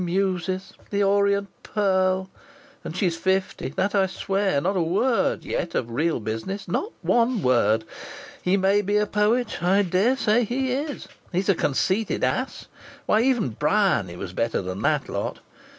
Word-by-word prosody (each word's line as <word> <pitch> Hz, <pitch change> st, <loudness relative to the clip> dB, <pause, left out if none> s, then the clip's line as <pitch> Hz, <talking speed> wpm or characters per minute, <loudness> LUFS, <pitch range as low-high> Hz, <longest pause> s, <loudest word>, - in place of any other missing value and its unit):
'Muses'! 185 Hz, +1 st, -1 dB, 0.2 s
'The 200 Hz, 0 st, +1 dB
Orient 200 Hz, 0 st, +2 dB
Pearl.' 190 Hz, -2 st, +1 dB, 0.6 s
And 165 Hz, -, -6 dB
she's 175 Hz, -4 st, +1 dB
fifty 190 Hz, -5 st, -1 dB
that 190 Hz, +1 st, 0 dB
I 195 Hz, -2 st, +3 dB
swear! 195 Hz, -3 st, 0 dB
Not 190 Hz, +7 st, -1 dB
a 180 Hz, -, +2 dB
word 200 Hz, +9 st, +1 dB
yet 170 Hz, -, -3 dB
of 120 Hz, -1 st, -1 dB
real 155 Hz, +6 st, 0 dB
business 115 Hz, -, -4 dB
not 395 Hz, -, -2 dB
one 235 Hz, -3 st, +2 dB
word! 115 Hz, -3 st, +3 dB, 0.6 s
He 185 Hz, +2 st, +2 dB
may 195 Hz, +2 st, +3 dB
be 205 Hz, +1 st, 0 dB
a 210 Hz, -, +2 dB
poet. 215 Hz, +3 st, 0 dB
I 190 Hz, +4 st, +3 dB
daresay 215 Hz, +5 st, +2 dB
he 255 Hz, +3 st, -1 dB
is. 285 Hz, +2 st, -3 dB, 0.2 s
He's 185 Hz, +2 st, -1 dB
a -, -, +6 dB
conceited 190 Hz, +8 st, 0 dB
ass. -, -, -1 dB, 0.4 s
Why, 215 Hz, -, +3 dB
even 245 Hz, -, +2 dB
Bryany 110 Hz, -, +1 dB
was -, -, -7 dB
better 115 Hz, 0 st, 0 dB
than 95 Hz, +1 st, -5 dB
that -, -, +1 dB
lot. -, -, -3 dB
195 Hz, 155 wpm, -24 LUFS, 175-210 Hz, 0.6 s, a